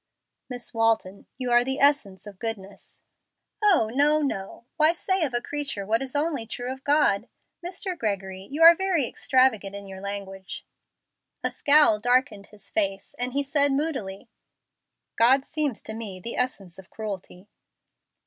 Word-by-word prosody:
"Miss 245 -1 -5
Walton, 225 -4 0
you 250 -1 -3
are 240 0 +5
the 265 +2 -2
essence 270 -11 +2
of 200 -3 -11
goodness." 205 -4 -7 0.6
"Oh, 350 - +4
no, 295 +3 +3
no; 210 -4 -4
why 310 +1 +5
say 375 +1 0
of 260 -6 -1
a 240 - 0
creature 285 -9 -4
what 225 +4 +1
is 270 +1 -6
only 290 -6 -1
true 245 +3 -4
of 265 0 -14
God? 285 -7 +2 0.3
Mr. 365 +1 -4
Gregory, 195 - -4
you 300 +4 0
are 335 +1 +11
very 345 -7 0
extravagant 230 -8 +1
in 200 0 -8
your 190 -1 -9
language." 195 -1 -6 0.8
A - - 0
scowl 290 -7 +4
darkened 245 -3 +1
his 210 -1 -9
face, 195 -2 -1
and 245 0 -2
he 285 +1 0
said, 280 0 +2
moodily, 265 -9 -3 0.9
"God 260 +4 +5
seems 300 -7 -2
to 220 - -6
me 215 -4 -6
the 235 +6 -4
essence 195 -8 -2
of 190 - -14
cruelty." 200 -3 -7
240 Hz, 160 wpm, -25 LUFS, 200-285 Hz, 0.9 s, are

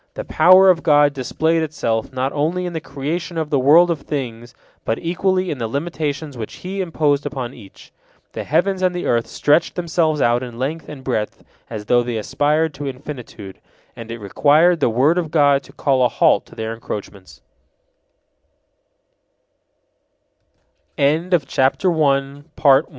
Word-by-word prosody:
The - - -5
power 185 +1 +6
of 170 -2 -1
God 145 -2 +4
displayed 160 +5 0
itself 115 -8 -2
not 130 +1 -2
only 165 +5 -1
in 175 - -5
the 160 - -4
creation 160 +6 -5
of 160 -1 -3
the 140 - +2
world 165 +7 +5
of 160 -4 -3
things, 120 -4 -6 0.3
but 115 - -1
equally 185 +2 -1
in 140 - -5
the 115 - -2
limitations 145 +1 -4
which 110 -3 -7
He 195 +1 -3
imposed 150 -5 0
upon 135 -4 -5
each. 105 -7 -15 0.4
The - - -5
heavens 185 +5 0
and 180 -1 +1
the 175 - -3
earth 115 -1 +1
stretched 150 +3 +1
themselves 165 -3 0
out 120 -1 +2
in 120 -2 -8
length 150 +6 -4
and 145 -3 -9
breadth 110 -5 -3 0.3
as 105 -2 -6
though 120 +3 +3
they 120 -1 -3
aspired 150 +8 0
to 145 0 -5
infinitude, 125 -7 -8 0.4
and 115 0 -10
it 115 - -5
required 150 - +3
the - - +2
word 140 +10 +2
of 165 -3 -3
God 145 -3 +3
to - - -16
call 135 -3 +1
a 125 - +3
halt - - +2
to - - -16
thei 110 0 -4
145 Hz, 150 wpm, -20 LUFS, 125-165 Hz, 0.4 s, power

